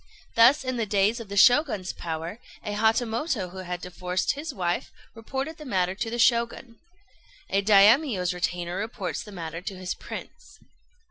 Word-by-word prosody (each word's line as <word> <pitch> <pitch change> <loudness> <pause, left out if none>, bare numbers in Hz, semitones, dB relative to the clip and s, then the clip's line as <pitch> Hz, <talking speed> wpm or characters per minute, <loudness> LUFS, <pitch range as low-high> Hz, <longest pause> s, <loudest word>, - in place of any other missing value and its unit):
Thus, 245 +5 +6
in 255 -1 -2
the 225 -2 -1
days 205 +4 +2
of 225 -4 -9
the 200 - -4
Shoguns' 245 - +4
power, 165 +5 -5 0.3
a 210 - -3
Hatamoto 225 - 0
who 190 - -8
had 180 -1 -5
divorced 180 +1 -2
his 300 +2 -5
wife 180 -7 -2 0.2
reported 265 +7 -5
the 305 - -10
matter 185 -9 0
to 225 +4 -3
the 235 - -3
Shogun. 235 0 +1 0.7
A 195 - +3
Daimio's 205 - +5
retainer 175 0 -2
reports 215 -1 -4
the 215 -3 -11
matter 165 -3 -6
to 195 +1 -6
his 185 0 -3
Prince. - - -10
210 Hz, 160 wpm, -26 LUFS, 180-235 Hz, 0.7 s, Thus